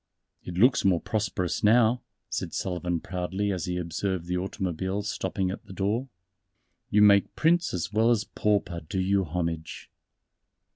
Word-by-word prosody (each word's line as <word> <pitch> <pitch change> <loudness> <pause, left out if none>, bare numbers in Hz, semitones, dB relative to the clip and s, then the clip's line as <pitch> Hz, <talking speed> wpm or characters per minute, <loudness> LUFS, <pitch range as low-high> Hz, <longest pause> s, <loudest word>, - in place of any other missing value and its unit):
"It 90 - -7
looks 125 +8 +4
more 95 -3 +3
prosperous 100 -4 -2
now," 115 +2 +4 0.3
said - - -4
Sullivan 90 -2 -2
proudly 95 +3 -2
as 90 -4 -2
he 90 0 -2
observed 90 +1 -2
the 90 +1 -2
automobiles 95 +2 -2
stopping 95 0 -2
at - - -7
the - - -10
door, 105 +8 -1 0.8
"you 105 0 +5
make 100 -1 +5
Prince 170 +2 +2
as 90 +3 -3
well 110 +2 +3
as 115 -3 +3
Pauper 100 -5 0
do 95 - -1
you 95 +1 +2
homage." 80 -1 -4
95 Hz, 150 wpm, -27 LUFS, 90-105 Hz, 0.8 s, you